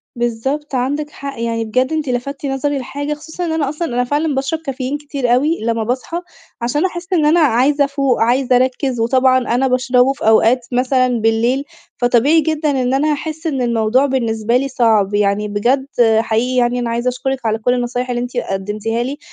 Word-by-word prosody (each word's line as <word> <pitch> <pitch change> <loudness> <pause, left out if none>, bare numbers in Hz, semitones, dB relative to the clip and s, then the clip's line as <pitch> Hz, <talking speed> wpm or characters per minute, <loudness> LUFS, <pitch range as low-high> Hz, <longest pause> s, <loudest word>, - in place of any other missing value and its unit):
بالضبط، 265 +5 -2
عندِك 285 +4 -1
حق، 280 -4 -8
يعني 230 -1 -1
بجد 255 +6 0
أنتِ 310 -4 -2
لَفَتِّ 275 +3 -3
نظري 280 +1 -1
لحاجة، 285 +3 -4
خصوصًا 315 +4 -6
إنّ 330 - -2
أنا 315 -4 0
أصلًا 315 +3 -3
أنا 245 +1 +1
فعلًا 290 +3 -1
باشرب 275 +4 -1
كافيين 275 -2 -4
كتير 280 -4 -1
أوي 300 +6 +1
لمّا 230 -1 0
باصحى، 260 +9 -3 0.4
عشان 290 +9 0
أحسّ 360 0 -4
إنّ 320 -4 +3
أنا 315 +3 +4
عايزة 280 0 +3
أفوق، 275 -4 0
عايزة 250 +2 +2
أرَكِّز، 255 0 0
وطبعًا 255 +2 +3 0.2
أنا 265 +2 +2
باشربه 255 0 +2
في 275 - -4
أوقات 230 +2 +4
مثلًا 255 +1 +2
بالليل، 230 +5 +1 0.3
فطبيعي 250 +6 +3
جدًا 310 0 -1
إنّ 255 -1 0
أنا 300 +3 +2
هاحسّ 315 +2 -4
إنّ 270 -4 -1
الموضوع 235 +2 +2
بالنسبة 235 -3 0
لي 275 - -1
صعب. 220 -6 +2
يعني 205 0 +1
بجد 245 +7 0 0.3
حقيقي 230 +3 0
يعني 245 0 +2
أنا 240 -1 -2
عايزة 235 +2 -2
أشكرِك 260 0 -3
على 220 0 +1
كل 245 +3 +1
النصايح 245 +1 -2
اللي 240 0 -1
أنتِ 245 0 -5
قدمتيها 210 +3 -2
لي. 270 +4 -4
255 Hz, 185 wpm, -17 LUFS, 235-285 Hz, 0.4 s, أنا